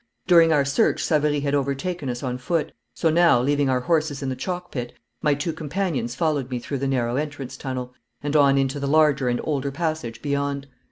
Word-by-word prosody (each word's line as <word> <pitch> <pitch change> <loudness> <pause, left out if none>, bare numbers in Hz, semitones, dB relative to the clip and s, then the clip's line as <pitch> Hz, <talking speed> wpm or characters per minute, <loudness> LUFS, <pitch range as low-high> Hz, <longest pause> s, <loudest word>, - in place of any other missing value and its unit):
During 170 -2 +6
our 145 -3 +3
search 140 +1 +2
Savary 150 -2 +1
had 140 0 -1
overtaken 140 +2 -1
us 120 +1 -4
on 125 -1 -3
foot, 160 +4 -1 0.2
so 165 - +2
now, 170 -6 +5
leaving 140 +2 +1
our 130 -1 +1
horses 155 -1 0
in 135 - -1
the 130 - -2
chalk 180 +4 -5
pit, 120 -2 -5 0.3
my 150 -2 +3
two 150 +4 -2
companions 155 -6 -2
followed 145 -4 0
me 125 - -2
through 130 +3 -4
the 135 - -1
narrow 125 -2 0
entrance 145 -3 -4
tunnel, 125 -2 -5 0.3
and 145 +1 -2
on 140 -2 +5
into 135 +1 0
the 140 - -2
larger 145 -3 +3
and 120 - 0
older 140 -2 -1
passage 140 -6 -3
beyond. 140 -1 -1
140 Hz, 205 wpm, -24 LUFS, 130-155 Hz, 0.3 s, During